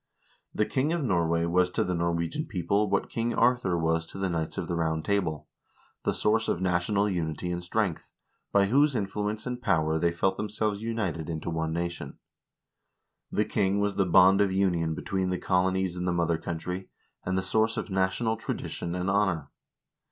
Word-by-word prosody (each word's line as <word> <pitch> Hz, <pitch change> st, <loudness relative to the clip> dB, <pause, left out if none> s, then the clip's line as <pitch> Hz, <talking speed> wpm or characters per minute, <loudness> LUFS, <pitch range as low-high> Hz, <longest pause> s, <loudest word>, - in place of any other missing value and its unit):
The 105 Hz, -, +1 dB
king 140 Hz, +7 st, 0 dB
of 170 Hz, -3 st, -1 dB
Norway 85 Hz, -6 st, +1 dB
was 90 Hz, +1 st, +2 dB
to -, -, 0 dB
the 90 Hz, -, -1 dB
Nor 85 Hz, 0 st, 0 dB
wegian 85 Hz, -, -2 dB
people 100 Hz, +2 st, 0 dB
what 100 Hz, -, +1 dB
King 115 Hz, +1 st, -2 dB
Arthur 120 Hz, -7 st, +2 dB
was 80 Hz, 0 st, +1 dB
to -, -, -9 dB
the 95 Hz, -1 st, -1 dB
Knights 80 Hz, -2 st, -2 dB
of -, -, -3 dB
the -, -, -2 dB
Round 80 Hz, -2 st, -1 dB
Table 95 Hz, -7 st, -1 dB, 0.3 s
— -, -, -35 dB
the -, -, +3 dB
source 110 Hz, +1 st, +2 dB
of -, -, 0 dB
national 95 Hz, +3 st, +1 dB
unity 85 Hz, -2 st, -2 dB
and 90 Hz, 0 st, -3 dB
strength, 90 Hz, -1 st, -1 dB, 0.4 s
by 100 Hz, 0 st, +4 dB
whose 140 Hz, +6 st, +3 dB
in 105 Hz, -, +1 dB
fluence 105 Hz, +2 st, -3 dB
and 125 Hz, -1 st, -4 dB
power 80 Hz, -6 st, +1 dB
they 85 Hz, +1 st, +2 dB
felt 95 Hz, +3 st, 0 dB
themselves 105 Hz, 0 st, -2 dB
united 95 Hz, -9 st, -2 dB
into 80 Hz, +1 st, -3 dB
one 80 Hz, -1 st, -1 dB
nation. 85 Hz, -4 st, -4 dB, 1.1 s
The 105 Hz, -, +1 dB
king 100 Hz, -1 st, +1 dB
was 100 Hz, 0 st, +1 dB
the 95 Hz, -2 st, +2 dB
bond 95 Hz, +3 st, +6 dB
of 100 Hz, -2 st, +2 dB
union 90 Hz, -4 st, +1 dB
between 95 Hz, +1 st, -2 dB
the 90 Hz, -, 0 dB
colonies 95 Hz, 0 st, +1 dB
and 90 Hz, 0 st, -3 dB
the -, -, +2 dB
mother 85 Hz, -1 st, +1 dB
country, 90 Hz, +3 st, -5 dB, 0.3 s
and 95 Hz, +1 st, -1 dB
the 95 Hz, -, 0 dB
source 110 Hz, +4 st, +1 dB
of -, -, -4 dB
national 95 Hz, +4 st, +1 dB
tradition 85 Hz, -5 st, -4 dB
and 90 Hz, +1 st, -2 dB
honor. 95 Hz, -7 st, +1 dB
95 Hz, 190 wpm, -28 LUFS, 85-105 Hz, 1.1 s, bond